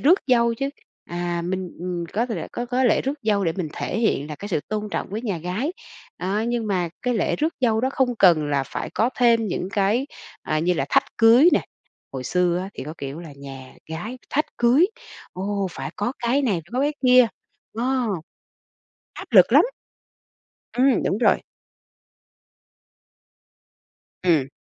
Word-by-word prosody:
rước 345 +7 +5
dâu 235 -2 +3
chứ, 275 +4 -2 0.3
à 175 0 -3
mình, 185 0 -2
ừm, 180 -1 -3
có 230 +4 0
thể 225 - -4
có 240 0 -3
có 255 +2 +1
lễ 235 - +3
rước 275 +2 -1
dâu 205 -3 +1
để 165 - +1
mình 175 -3 -3
thể 215 - -3
hiện 155 -10 +1
là 150 - -5
cái 205 - -7
sự 160 -6 0
tôn 215 0 -3
trọng - - -3
với 215 +3 -4
nhà 200 -8 -2
gái. 185 - -2 0.5
Đó, 200 +4 -1
nhưng 240 -2 -1
mà 185 -4 0
cái 250 0 0
lễ 215 - 0
rước 315 +2 0
dâu 225 -3 +2
đó 260 - +1
không 250 -3 +1
cần 165 -6 +5
là 140 -2 +1
phải - - -5
có 235 +3 +2
thêm 230 -2 +4
những 180 +1 -3
cái, 210 +7 +1 0.4
à, 155 - -1
như 175 +3 +1
là - - -1
thách 275 0 +4
cưới 235 +8 +7
nè. - - +2 0.5
Hồi 130 -1 -5
xưa 180 +3 +1
á 190 +2 -5
thì 130 - -6
có 155 - -7
kiểu 140 +4 -6
là 160 -4 -10
nhà 135 -2 -10 0.2
gái 215 +11 -5
thách 300 +3 +1
cưới, 250 +9 +5 0.5
ồ, 195 +1 -2
phải - - -6
có 205 +5 -1
cái 245 +4 +1
này 230 -8 +2
phải 165 - -3
có 250 - 0
cái 290 +2 +1
kia. 250 -1 +7 0.5
Ờ. 255 0 +1 1.1
Áp - - -8
lực - - +7
lắm. - - +8 1.1
Ừm, 255 -2 +3
đúng 195 - 0
rồi. 240 - +3 2.8
Ừm. 160 -7 +3
210 Hz, 185 wpm, -23 LUFS, 175-245 Hz, 2.8 s, lắm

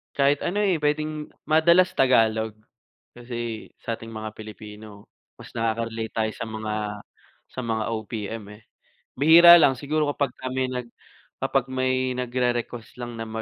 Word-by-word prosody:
Kahit 140 +1 +2
ano, 200 +4 -1
eh, 200 -3 +2
puwedeng 150 0 -2 0.2
madalas 170 +4 +4
Tagalog, 110 -4 +3 0.6
kasi 120 -2 -6
sa'ting 115 0 -5
mga 110 -1 -7
Pilipino 105 -1 -11 0.3
mas - - -12
nakaka-relate 115 0 -2
tayo 110 -1 0
sa - - -5
mga, 110 -1 -4 0.8
sa 130 - -5
mga 110 -1 -1
OPM 110 0 -5
eh. 105 - -18 0.6
Bihira 170 +4 +9
lang 135 -4 +4
siguro 150 +3 -1
kapagka 140 -2 -3
may 130 0 0
nag 125 -1 -4 0.6
kapag 135 -1 +1
may 130 0 0
nagre-request 120 -2 -2
lang 120 -1 -6
na 115 - -4
120 Hz, 135 wpm, -24 LUFS, 110-140 Hz, 0.8 s, Bihira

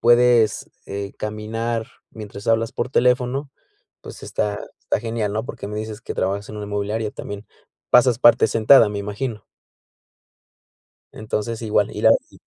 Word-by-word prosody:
puedes, 120 -2 +4 0.2
eh, 100 0 -6
caminar 110 +2 -3 0.2
mientras 105 -2 -9
hablas 115 0 +1
por - - -3
teléfono, 125 +2 +1 0.5
pues, - - -11
está 105 -1 -2 0.2
está - - -1
genial, 115 -2 -2
¿no?, 110 +1 -1
porque 100 - -7
me 105 - -5
dices 110 0 -6
que - - -5
trabajas 100 +2 -2
en 105 - -8
una 105 - -5
inmobiliaria 105 +1 -2
también, 100 +1 -8 0.4
pasas 125 -1 +5
parte 120 -3 +6
sentada, 110 +1 +5
me 105 - -4
imagino. 105 +2 -4 1.7
Entonces 110 +1 -4
igual, 105 -2 +1
ir - - 0
ahí. - - +1
110 Hz, 145 wpm, -22 LUFS, 105-115 Hz, 1.7 s, parte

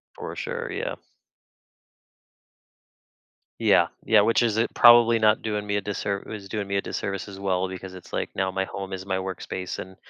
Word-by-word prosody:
For - - -7
sure, - - -4
yeah. - - -3 2.6
Yeah. - - +4 0.2
Yeah. 110 -2 +6
Which 115 +3 +3
is 110 -2 +1
i 115 - +3
probably 120 -1 +7
not 110 0 +4
doing 105 -2 -2
me 100 - 0
a - - -1
disserv 100 0 -3
is 100 -3 -7
doing 105 -2 -3
me 100 0 -1
a - - +1
disservice 100 0 -4
as 95 -1 -9
well, 95 -1 0
because 95 0 -8
it's 95 - -12
like, - - -1
now 95 0 0
my 95 0 -1
home 95 0 -6
is 95 0 -5
my 95 -1 -1
workspace, 95 -1 -5
and 95 0 -8
100 Hz, 185 wpm, -25 LUFS, 95-105 Hz, 2.6 s, probably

